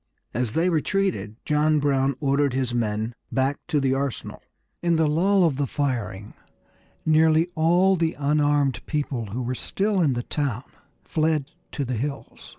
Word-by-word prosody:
As 120 -1 -1
they 165 +5 +2
retreated 170 - 0
John 150 +1 +2
Brown 140 -2 +1
ordered 140 -1 +1
his 130 -2 -1
men 110 -1 -1 0.2
back 135 +2 0
to 150 - +1
the 135 -1 +1
arsenal. 135 -1 -3 0.4
In 170 -1 +2
the 160 0 +3
lull 185 +6 +3
of 155 -6 +2
the 140 -1 0
firing 115 -9 -3 0.7
nearly 160 +1 +4
all 175 +4 +3
the 165 -2 0
unarmed 145 -3 +1
people 140 -7 -2
who 120 +6 -4
were 125 +2 -2
still 195 - -1
in 145 -6 +3
the 120 0 -3
town 135 -5 -2 0.4
fled 155 -2 0 0.2
to 140 - -2
the 125 -1 -2
hills. 140 +4 -5
145 Hz, 155 wpm, -24 LUFS, 130-160 Hz, 0.7 s, nearly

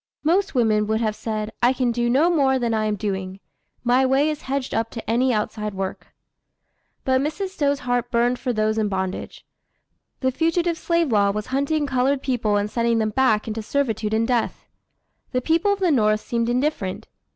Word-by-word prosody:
Most 375 +3 +1
women 215 -3 +2
would 220 0 +1
have 215 -2 -1
said, 215 -1 -4
"I 245 +2 +4
can 255 -2 0
do 240 0 0
no 295 +8 +4
more 270 -5 +3
than 235 -2 -1
I 215 -1 0
am 210 -1 0
doing. 190 -1 -4 0.4
My 250 +2 +3
way 270 +4 +3
is 305 0 -6
hedged 270 -1 -3
up 225 0 0
to 230 - -8
any 250 +3 +2
outside 210 -2 -2
work." 190 0 -4 1.0
But 260 0 +2
Mrs. 345 +7 -2
Stowe's 285 -6 0
heart 245 -1 -1
burned 245 0 +1
for 255 - -1
those 215 -1 0
in 210 -1 0
bondage. 190 -1 -4 0.8
The 260 -1 +2
Fugitive 330 +3 0
Slave 335 -5 +1
Law 200 -2 +3
was 210 +1 -2
hunting 290 +2 +1
colored 265 +1 +1
people 235 -6 0
and 205 0 0
sending 235 -1 +1
them 215 -1 0
back 220 -3 +2
into 220 0 -3
servitude 220 -3 -1
and 225 +1 +1
death. 245 -3 -1 0.7
The 255 - +2
people 330 +8 +2
of 405 - 0
the 365 -3 +2
North 215 -5 +3
seemed 235 -1 -1
indifferent. 245 -7 -1
240 Hz, 190 wpm, -23 LUFS, 215-280 Hz, 1.0 s, I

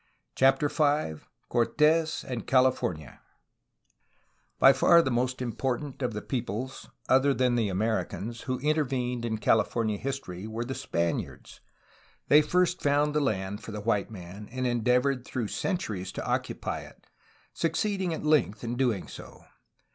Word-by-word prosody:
CHAPTER 135 +2 +3
V 145 - 0 0.2
CORTES 155 +7 +2
AND 120 -5 -5
CALIFORNIA 125 - +1 1.4
By 135 - +7
far 170 +6 +6
the 130 - -1
most 125 +2 0
important 130 +4 -3
of 125 -3 -1
the 105 - -5
peoples 125 +1 -4 0.2
other 135 +1 +4
than 125 -1 +2
the 115 -4 +1
Americans 110 +3 -2
who 130 - 0
intervened 130 -5 0
in 110 -1 -1
CaUfornia 110 0 +1
history 110 -8 -5
were 115 +2 -4
the 130 - -4
Spaniards. 85 -8 -3 0.7
They 150 +1 +8
first 180 +3 +1
found 145 +1 +2
the 150 - +2
land 100 -6 -2
for - - -8
the 105 - -5
white 105 -2 0
man, 100 0 -10
and 130 +1 -3
endeavored 125 +2 +1
through 120 -4 -4
centuries 110 - -3
to - - -5
occupy - - -2
it, - - -14 0.5
succeeding 185 +3 -1
at 160 - -4
length 150 -9 +2
in 120 +1 -3
doing 120 -7 0
so. - - -11
125 Hz, 140 wpm, -28 LUFS, 110-140 Hz, 1.4 s, They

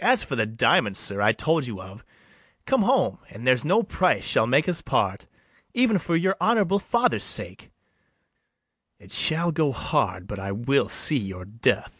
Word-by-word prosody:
] - - -8
As 250 +2 +3
for 135 - -5
the 110 -3 0
diamond, 110 -2 +1
sir, 100 0 0
I 105 +1 +4
told 155 +3 -1
you 105 -5 -7
of, 95 +4 -12 0.6
Come - - +1
home, - - +1
and 115 +5 -11
there's 130 -2 +3
no 195 +9 +2
price 185 -1 0
shall 110 - +2
make 140 +5 +2
us 175 -2 0
part, - - -1 0.5
Even 240 -5 +2
for 170 +1 -2
your 190 +3 +1
honourable 205 -4 +2
father's 235 +4 0
sake, - - -3 1.3
It - - -18
shall 170 +2 +1
go 155 -3 0
hard 90 -6 -2
but 100 0 -7
I 100 +1 -5
will 130 +7 0
see 150 - +3
your 95 -3 -7
death. 110 +4 -1
135 Hz, 180 wpm, -24 LUFS, -, 1.3 s, I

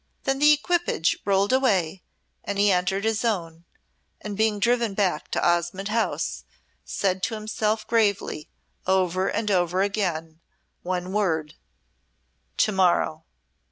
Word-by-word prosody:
Then 270 0 0
the 300 +1 +6
equipage 320 - +1
rolled 200 +3 +2
away 195 -10 +1 0.4
and 200 - -4
he 205 0 +4
entered 185 +2 0
his 220 0 0
own, 170 -7 -2 0.5
and 210 -1 -6
being 220 0 +1
driven 235 -1 +1
back 185 -7 0
to - - 0
Osmonde 175 +3 0
House 225 +1 -1 0.4
said 190 -1 -1
to 225 +3 -1
himself 215 0 -2
gravely, 205 -9 0 0.4
over 185 0 +1
and 210 -2 -1
over 180 0 +2
again, 170 -6 -2 0.4
one 180 +1 -3
word 160 -7 0 1.0
"To 215 - +3
morrow!" 175 -4 +1
195 Hz, 125 wpm, -25 LUFS, 180-215 Hz, 1.0 s, the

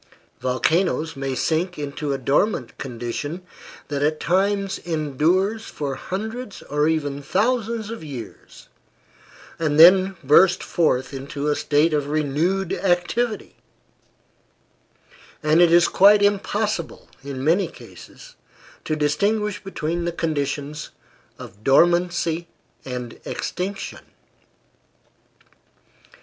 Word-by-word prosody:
Volcanoes 160 +5 0
may 135 -1 -3
sink 170 +6 -1
into 145 0 -4
a 135 - 0
dormant 135 - 0
condition 135 +7 -5 0.5
that 140 -1 -2
at 150 +1 +1
times 195 +3 0
endures 170 +7 0
for 140 -2 -4
hundreds 215 - -6
or 150 +1 0
even 145 -3 -1
thousands 225 - -1
of 230 - -7
years, 130 -8 -10 0.9
and 155 -2 0
then 185 +3 +7
burst 175 +7 +5
forth 135 -6 0
into 140 +2 -4
a 150 - +2
state 150 +3 +2
of 145 -2 0
renewed 155 +6 0
activity; 200 +5 -1 1.9
and 155 +2 +4
it 175 -1 +5
is 170 0 +6
quite 205 +2 +6
impossible, 205 -2 -1 0.2
in 135 -2 -6
many 170 +7 +2
cases, - - -14 0.5
to 155 - -1
distinguish 200 +8 0
between 170 -2 -3
the 170 - -1
conditions 150 -2 -3 0.5
of 105 +2 -12
dormancy 170 +3 +2 0.4
and 125 -2 -6
extinction. 195 +2 -5
165 Hz, 105 wpm, -22 LUFS, 145-195 Hz, 1.9 s, then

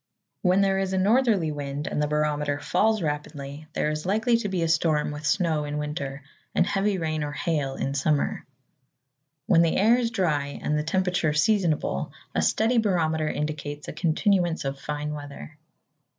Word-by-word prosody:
When 185 +1 +3
there 195 -1 +2
is 190 -1 -1
a - - +1
northerly 205 -4 +3
wind, 145 0 -4
and - - -1
the 150 - +1
barometer 150 -1 0
falls 215 +4 +1
rapidly, 145 0 -5
there 150 - 0
is 155 0 -3
likely 220 +6 +2
to 210 -3 -3
be 185 -3 -1
a - - +1
storm 160 -3 +1
with 150 +1 -5
snow 165 -3 +1
in 145 0 -4
winter, 145 -2 -4 0.3
and - - +4
heavy 195 +1 0
rain 155 -3 -2
or 145 - -3
hail 145 -6 -1
in 135 - -2
summer. 145 +1 0 1.0
When 170 -4 +5
the 165 -1 +2
air 230 +5 +5
is 235 -2 0
dry 150 -10 -1
and 150 - 0
the 150 - +1
temperature 180 -1 0
seasonable, 155 - +1 0.2
a - - +1
steady 230 +2 +2
barometer 160 -7 +1
indicates 150 -1 -4
a - - -5
continuance 175 -1 +1
of 135 0 -3
fine 150 +1 -4
weather. 145 - -9
155 Hz, 175 wpm, -26 LUFS, 150-190 Hz, 1.0 s, When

